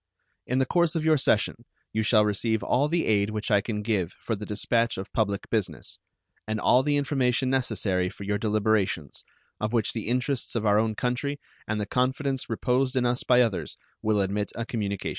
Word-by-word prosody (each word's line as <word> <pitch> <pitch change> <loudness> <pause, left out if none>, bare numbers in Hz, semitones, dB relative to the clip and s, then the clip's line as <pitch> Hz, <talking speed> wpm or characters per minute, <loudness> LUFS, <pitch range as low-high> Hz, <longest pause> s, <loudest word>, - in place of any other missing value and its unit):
In 125 - 0
the 130 - +3
course 170 +3 +2
of 160 -1 -1
your 155 -1 +5
session - - +1 0.3
you 110 - +1
shall 110 -1 +4
receive 110 +2 0
all 140 +4 +2
the 165 +2 0
aid 105 -1 +2
which 110 +2 -3
I 100 -1 +5
can 105 -1 -4
give 100 -5 -1
for 115 - -4
the 105 +1 -7
dispatch 115 +2 +1
of 95 +2 -7
public 100 -3 -1
business, 110 -4 -2 0.5
and 110 0 -2
all 125 - +4
the 145 +1 +1
information 130 -2 +1
necessary 95 -8 0
for 100 - -10
your 105 +1 -1
deliberations, 105 - 0 0.4
of 110 +2 -2
which 115 -3 +1
the 110 -3 -4
interests 125 +2 -1
of 115 -1 -1
our 105 0 +4
own 110 0 0
country 130 +5 -2 0.3
and 105 0 -1
the 105 - -1
confidence 130 +3 -1
reposed 125 +3 0
in 125 -1 +2
us 120 +1 +1
by 125 0 +5
others 110 -6 -3 0.2
will 105 -2 +2
admit 100 +2 -1
a 115 - -3
communication. 100 -5 -3
115 Hz, 200 wpm, -26 LUFS, 105-130 Hz, 0.5 s, your